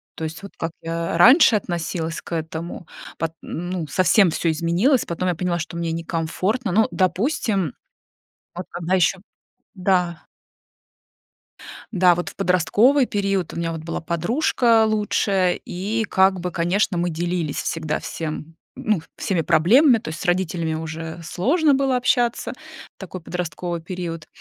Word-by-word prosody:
То 160 - -6
есть, 160 +4 -5
вот 200 - -8
как 165 0 -3
я 165 0 -2
раньше 250 - +7
относилась 170 -2 -3
к - - -14
этому, 165 +1 -5 0.3
пот 165 -1 -2
ну 175 -1 -4
совсем 185 +4 +4
всё 165 - 0
изменилось, 175 - +2
потом 175 +2 -3
я 175 - 0
поняла, 175 0 -1
что 165 +1 -6
мне 170 -1 -2
некомфортно. 170 +7 -2
Ну, 220 +4 +3
допустим, 190 - 0 0.8
вот 180 +1 -5
когда 175 +2 -1
еще 185 +1 +2 0.6
да. 180 -3 0 1.7
Да, 180 -3 +5
вот 175 - -3
в - - -15
подростковый 205 - +3
период 195 -3 -1
у - - -7
меня 170 0 -1
вот 160 -1 -5
была 165 +1 -4
подружка 225 - +2
лучшая, 200 -3 +1
и 205 +5 -2
как 190 0 +3
бы, 180 0 -3
конечно, 175 +2 +1
мы 175 +1 0
делились 170 -2 -2
всегда 155 -2 -2
всем, 160 0 -6 0.2
ну, 215 -6 0 0.2
всеми 180 -4 0
проблемами, 220 - +5
то 220 - -7
есть 160 - -6
с - - -5
родителями 175 -3 0
уже 160 +1 -6
сложно 280 - +2
было 270 -1 +2
общаться 245 -1 +1 0.4
в - - -65
такой 185 -1 -8
подростковый 170 0 -4
период. 165 -2 -6
175 Hz, 150 wpm, -22 LUFS, 165-200 Hz, 1.7 s, раньше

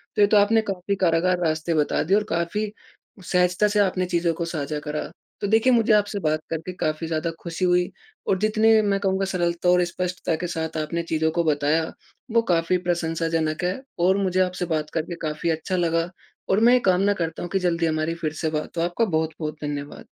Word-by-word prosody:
तो 210 - +2
ये 205 - +7
तो 210 0 +4
आपने 220 +2 +4
काफ़ी 195 -1 -3
कारागार 175 +2 +2
रास्ते 160 +1 0
बता 150 -2 +1
दिए 190 +6 +3
और 210 - +1
काफ़ी 205 +5 -1 0.5
सहजता 180 +3 +2
से 210 0 +1
आपने 185 -2 +2
चीज़ों 170 -2 0
को 170 +1 -3
साझा 150 -2 -3
करा। 150 0 -4 0.3
तो 205 - 0
देखिए 225 +4 +4
मुझे 225 -2 +4
आपसे 205 -1 +2
बात 155 0 +1
करके 165 +3 -4
काफ़ी 155 +1 -1
ज़्यादा 160 +1 -1
खुशी 170 +2 -3
हुई 180 +1 +2 0.4
और 190 - +2
जितने 215 +1 +4
मैं 200 -2 +1
कहूँगा 195 0 0
सरलता 175 -2 0
और 180 0 +5
स्पष्टता 180 -1 -2
के 175 - -1
साथ 160 -1 -3
आपने 170 +2 -3
चीज़ों 160 -1 0
को 170 - +3
बताया 155 +1 +2 0.5
वो 230 +1 +4
काफ़ी 165 +2 +2
प्रशंसाजनक 165 -2 -1
है। 180 +8 -1 0.2
और 185 +3 +3
मुझे 185 -2 0
आपसे 180 -1 -1
बात 150 -1 -3
करके 165 +2 -2
काफ़ी 155 +1 -2
अच्छा 160 +4 -1
लगा। 165 0 +1 0.4
और 195 - +3
मैं 240 +2 +6
ये 250 - +5
कामना 195 +3 +2
करता 165 -4 -4
हूँ 175 - -5
कि 195 - +1
जल्दी 170 -2 +1
हमारी 155 +1 0
फिर 155 -2 -3
से 160 0 -2
बात 155 +2 -4
हो, - - +1
आपका 175 +7 +1
बहुत-बहुत 160 -3 -2
धन्यवाद। 145 -1 -5
175 Hz, 205 wpm, -24 LUFS, 160-195 Hz, 0.5 s, ये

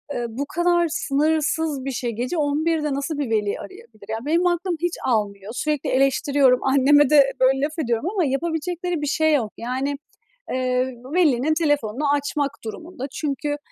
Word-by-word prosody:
ııı, 240 - -2
bu 260 +6 -4
kadar 345 +2 +2
sınırsız 305 -1 0
bir 275 - -2
şey. 245 -2 -2
Gece 245 +9 -3
23.00'de 300 0 0
nasıl 280 +2 -3
bir 285 -5 -2
veli 210 -2 0
arayabilir? 385 - -12
Ya, 220 - -2
benim 335 +4 +2
aklım 350 +1 0
hiç 350 -1 0
almıyor! 210 -3 -1
Sürekli 300 +3 -1
eleştiriyorum, 270 -1 +3
anneme 280 +1 +4
de, 280 -3 +6
böyle, 265 +1 +3
laf 300 +3 -2
ediyorum 240 +3 0
ama 390 -5 0
yapabilecekleri 335 +4 -2
bir 295 - -2
şey 315 +2 +2
yok. 230 -8 0
Yani, 260 +4 -2 0.6
eee, 255 0 +1 0.3
velinin 310 -4 +3
telefonunu 290 -4 0
açmak 285 0 -1
durumunda 315 +5 -7
çünkü 290 0 -2
285 Hz, 155 wpm, -22 LUFS, 255-320 Hz, 0.6 s, de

